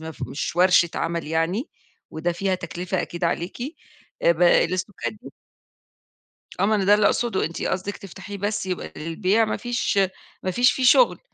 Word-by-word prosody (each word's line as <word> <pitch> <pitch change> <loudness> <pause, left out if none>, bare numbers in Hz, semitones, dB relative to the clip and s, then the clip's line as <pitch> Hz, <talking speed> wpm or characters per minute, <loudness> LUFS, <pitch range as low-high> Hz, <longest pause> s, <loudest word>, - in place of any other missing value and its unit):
ما 160 0 -6
ف - - -12
مش 160 - -4
ورشة 180 -1 +5
عمل 170 -1 -2
يعني 165 - -1 0.4
وده 170 +2 -2
فيها 190 +2 -1
تكلفة 180 +1 -3
أكيد 170 0 -5
عليكِ، 170 +4 -2 0.6
آآ 170 - +5
ب 170 +1 -2
الاستوكات 175 - +2
دي 105 - -13 1.3
آه، 195 - +3
ما 215 +1 +3
أنا 200 - 0
ده 200 - +5
اللي 210 0 +4
أقصده، 230 -2 +1
أنتِ 165 - -6
قصدِك 190 +2 -2
تفتحيه 195 +1 -9
بس 205 +1 -2
يبقى 185 -1 -4
للبيع 185 +7 +1
ما 215 - -2
فيش 240 -4 -1 0.4
ما 185 - -1
فيش 245 +6 +4
فيه 260 - -3
شُغل، 480 - +5
185 Hz, 175 wpm, -23 LUFS, 170-205 Hz, 1.3 s, ورشة